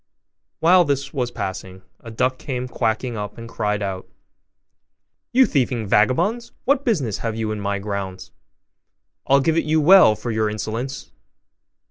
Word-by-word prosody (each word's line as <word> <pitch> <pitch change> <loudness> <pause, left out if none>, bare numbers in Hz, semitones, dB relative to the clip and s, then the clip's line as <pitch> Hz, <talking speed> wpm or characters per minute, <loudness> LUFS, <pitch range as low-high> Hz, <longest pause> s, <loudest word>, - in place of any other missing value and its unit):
While 180 +2 +6
this 140 -2 -2
was 125 -4 -1
passing, 95 -3 -6 0.2
a 115 - -11
duck 125 +3 -1
came 125 -2 -4
quacking 120 0 -2
up 105 -1 -6
and 115 0 -8
cried 105 -2 -2
out, 95 -2 -5 1.2
'You 260 +1 +5
thieving 125 - 0
vagabonds, 175 - +1
what 280 +1 +2
business 150 - -1
have 115 -2 -3
you 110 -1 -2
in 105 - -4
my 100 0 -2
grounds? 95 -2 -5 1.0
I'll 140 +1 +5
give 160 +3 +1
it 165 - +2
you 155 +1 +2
well 170 - +7
for 120 - -5
your 110 -1 0
insolence! 110 +5 -5
120 Hz, 150 wpm, -21 LUFS, 105-145 Hz, 1.2 s, well